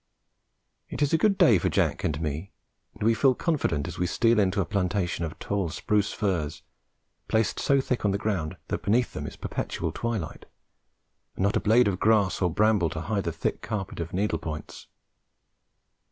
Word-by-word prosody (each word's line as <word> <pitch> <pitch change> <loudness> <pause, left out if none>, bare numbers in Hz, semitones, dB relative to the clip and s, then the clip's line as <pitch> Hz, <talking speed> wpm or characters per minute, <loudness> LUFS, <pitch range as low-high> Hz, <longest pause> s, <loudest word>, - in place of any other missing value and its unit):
It - - -1
is 145 - 0
a - - +6
good 205 -3 +3
day 110 -7 +6
for - - 0
Jack - - 0
and 75 -1 -1
me, 80 +4 -4 0.4
and - - -6
we 115 +1 +4
feel 130 +4 +3
confident 135 - 0
as 90 0 -7
we 90 - +1
steal 115 +5 +3
into 100 -1 +2
a 95 - +2
plantation 90 -3 -1
of 80 - -7
tall 100 -4 -2
spruce 105 +5 0
firs, 85 -6 -2 0.6
placed 110 -1 +1
so 140 0 +3
thick 125 -2 -1
on 105 - +3
the 100 - +1
ground 95 -7 -2
that - - -2
beneath 120 +4 +1
them - - -5
is - - -8
perpetual - - -3
twilight, 110 -9 -4 0.9
and - - -2
not 100 +1 +2
a - - +3
blade 115 +3 +4
of 95 -2 -1
grass 105 -4 +3
or 90 - +3
bramble 105 -2 +3
to 80 +1 -5
hide 100 +2 -2
the 85 - 0
thick - - -3
carpet 100 -7 -4
of 85 0 -4
needle 95 -3 0
points. 75 -2 -7
100 Hz, 190 wpm, -27 LUFS, 85-110 Hz, 0.9 s, a